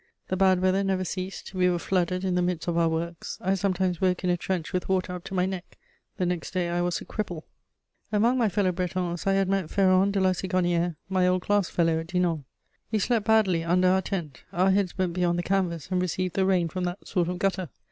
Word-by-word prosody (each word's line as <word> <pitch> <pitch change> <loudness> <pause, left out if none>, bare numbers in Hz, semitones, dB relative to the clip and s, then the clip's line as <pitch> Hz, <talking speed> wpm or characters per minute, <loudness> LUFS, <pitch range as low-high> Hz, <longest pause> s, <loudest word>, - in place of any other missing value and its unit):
The 185 - 0
bad 185 -1 +3
weather 185 +1 +3
never 190 -1 0
ceased; 185 +2 -5
we 180 -1 +3
were 175 - +1
flooded 180 +1 0
in 185 - 0
the 180 - +2
midst 175 -2 -1
of 170 - 0
our 170 -1 +3
works; 165 +1 -4
I 190 +2 +1
sometimes 185 -2 0
woke 185 -1 +1
in 180 - +2
a - - +3
trench 175 0 -3
with 180 0 -2
water 185 -1 0
up 180 -1 -6
to 195 - -5
my 180 0 +2
neck: 190 -1 -6 0.4
the 180 - 0
next 175 0 -3
day, 175 -2 0
I 175 0 0
was 175 0 0
a - - -9
cripple. 175 -7 -4 0.7
Among 225 +4 +3
my 235 -4 +2
fellow 190 0 +1
Bretons 180 -1 -2
I 195 - +4
had 195 -1 +2
met 195 -4 0
Ferron 190 0 +4
de 200 0 0
La 190 -1 +3
Sigonnière, 175 -2 0
my 185 -1 +2
old 180 0 +1
class 205 -3 +1
fellow 165 -2 +1
at 165 - -6
Dinan. 175 -5 0 0.5
We 220 - +2
slept 220 +1 0
badly 200 -7 +3
under 180 +2 +3
our 190 +1 +3
tent; 170 -10 -5
our 185 +2 +3
heads 190 -2 0
went 185 -2 0
beyond 175 -1 +1
the 175 - -1
canvas 180 -5 -1
and 180 -1 +1
received 185 0 -1
the 190 -1 +1
rain 180 -3 +2
from 180 +3 -3
that 175 +2 -5
sort 175 -3 0
of 180 - -3
gutter. 190 -3 -1
185 Hz, 240 wpm, -26 LUFS, 175-190 Hz, 0.7 s, I